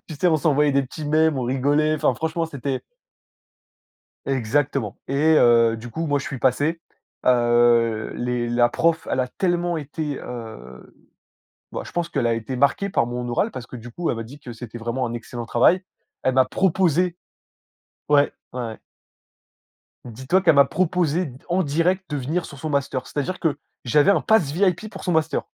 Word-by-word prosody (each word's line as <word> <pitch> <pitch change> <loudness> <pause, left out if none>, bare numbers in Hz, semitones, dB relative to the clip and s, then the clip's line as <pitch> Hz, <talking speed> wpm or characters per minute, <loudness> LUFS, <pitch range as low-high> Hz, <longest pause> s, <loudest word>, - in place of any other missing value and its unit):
Tu 155 - -6
sais, 165 - 0
on 160 - +3
s'envoyait 150 -1 +2
des 140 0 +3
petits 145 +4 -8
mèmes, 155 0 +2
on 130 - -2
rigolait. 145 +5 +1
Enfin, 155 - +1
franchement, 160 +1 -2
c'était 140 -3 -4 1.5
Exactement. 135 -3 -1
Et 155 +4 +3
heu, 115 -1 +5
du 120 +1 -9
coup, 165 +7 -3
moi, 145 -1 +1
je 140 - -6
suis 140 - -5
passé, 145 +7 +1 0.4
heu, 120 -2 +3
les 120 -1 -2
la 120 0 +3
prof, 165 +5 0
elle 130 - +1
a 125 - -1
tellement 175 0 -1
été, 150 -1 -4
heu, 110 - -9 0.8
bah, - - -4
je - - -11
pense 175 -1 -1
qu'elle 120 - -1
a 115 - +2
été 115 +3 -4
marquée 140 +9 +2
par 120 - +1
mon 120 0 -4
oral 120 - 0
parce 125 -2 -8
que, 125 - -9
du 120 0 -10
coup, 170 +8 -2
elle - - -2
m'a 115 - -4
dit 125 +6 -12
que 130 -4 -9
c'était 120 0 -9
vraiment 120 +2 -2
un 115 - -5
excellent 120 0 -6
travail. 130 - +3 0.4
Elle 130 - +1
m'a 130 0 +5
proposé 180 +1 +1 0.9
Ouais. 145 -1 +4 0.2
Ouais, 125 - -4
ouais. 110 -1 -7 1.3
Dis-toi 130 - 0
qu'elle 165 -4 +5
m'a 140 0 +7
proposé, 175 -3 0 0.2
en 180 +2 +2
direct, 170 +5 0
de 145 - -1
venir 155 +6 -2
sur 145 - -10
son 155 +1 -4
master. 140 -2 -1
C'est-à-dire 180 +6 -3
que 155 -3 0 0.3
j'avais 145 +9 +4
un - - +2
pass 195 -11 +2
VIP 185 +4 +1
pour 195 - -10
son 180 - 0
master. 160 -2 +1
140 Hz, 185 wpm, -23 LUFS, 120-160 Hz, 1.5 s, m'a